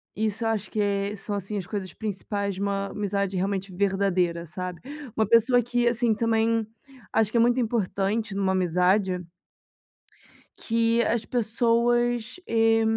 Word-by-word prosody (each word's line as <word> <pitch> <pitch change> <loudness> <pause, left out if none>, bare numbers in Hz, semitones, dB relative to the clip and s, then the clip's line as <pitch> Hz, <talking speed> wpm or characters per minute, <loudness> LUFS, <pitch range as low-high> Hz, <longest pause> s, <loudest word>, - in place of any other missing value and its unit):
isso 220 +1 -1
eu - - +2
acho 210 -3 -2
que 215 - -4
é 200 0 0
são, 205 0 -4
assim, 200 +1 -4
as 190 - -4
coisas 190 -1 -5
principais 200 -1 -3
de 190 - -6
uma 200 0 -1
amizade 200 -1 -2
realmente 190 +1 -2
verdadeira, 185 -3 +1
sabe, 180 +1 -6 0.4
uma 220 -2 +2
pessoa 230 +3 +5
que, 240 +1 +1
assim, 235 -1 +2
também, 225 0 +1 0.4
acho 220 -1 +2
que 235 - +1
é - - +5
muito 240 +2 +4
importante 215 -2 -1
numa 195 -1 +1
amizade 180 +1 +1 1.3
que 230 0 +1
as 235 -1 0
pessoas, 240 +2 +1
eh, 225 0 +3
210 Hz, 150 wpm, -26 LUFS, 195-230 Hz, 1.3 s, pessoa